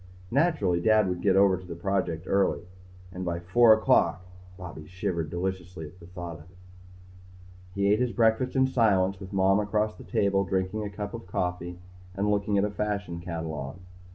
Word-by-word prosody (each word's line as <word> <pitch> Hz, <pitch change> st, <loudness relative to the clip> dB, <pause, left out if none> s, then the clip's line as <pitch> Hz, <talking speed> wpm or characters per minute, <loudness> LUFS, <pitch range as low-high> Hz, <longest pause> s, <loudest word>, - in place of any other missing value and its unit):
Naturally 115 Hz, -, +2 dB
Dad 110 Hz, 0 st, +4 dB
would 90 Hz, -1 st, -2 dB
get 95 Hz, -2 st, +3 dB
over 100 Hz, -1 st, +5 dB
to 95 Hz, -, -11 dB
the 90 Hz, -2 st, -7 dB
project 85 Hz, -2 st, -1 dB
early. 95 Hz, -3 st, +1 dB, 0.5 s
And 90 Hz, 0 st, -5 dB
at 85 Hz, 0 st, -3 dB
four 115 Hz, +5 st, +6 dB
o'clock 110 Hz, -5 st, +3 dB, 0.3 s
Bobby 85 Hz, -4 st, -9 dB
shivered 85 Hz, -2 st, -3 dB
deliciously 90 Hz, -1 st, -4 dB
at 85 Hz, +5 st, -13 dB
the 85 Hz, -, -13 dB
thought 90 Hz, -3 st, -7 dB
of 75 Hz, -, -14 dB
it. 90 Hz, -, -21 dB, 1.2 s
He 100 Hz, +1 st, +3 dB
ate 105 Hz, -, +1 dB
his 125 Hz, -1 st, +1 dB
breakfast 115 Hz, +3 st, +2 dB
in 130 Hz, 0 st, +4 dB
silence 100 Hz, -7 st, +2 dB
with 95 Hz, -1 st, -9 dB
Mom 95 Hz, 0 st, +3 dB
across 105 Hz, +1 st, 0 dB
the -, -, -12 dB
table 100 Hz, -1 st, +1 dB
drinking 95 Hz, +2 st, -1 dB
a 105 Hz, -, -4 dB
cup 100 Hz, +1 st, -6 dB
of 115 Hz, -5 st, -8 dB
coffee 90 Hz, -1 st, -3 dB, 0.4 s
and 100 Hz, +2 st, +1 dB
looking 100 Hz, 0 st, +1 dB
at 100 Hz, -, +3 dB
a 105 Hz, -, -3 dB
fashion 100 Hz, -4 st, -3 dB
catalogue. 80 Hz, -4 st, -5 dB
95 Hz, 180 wpm, -27 LUFS, 90-105 Hz, 1.2 s, four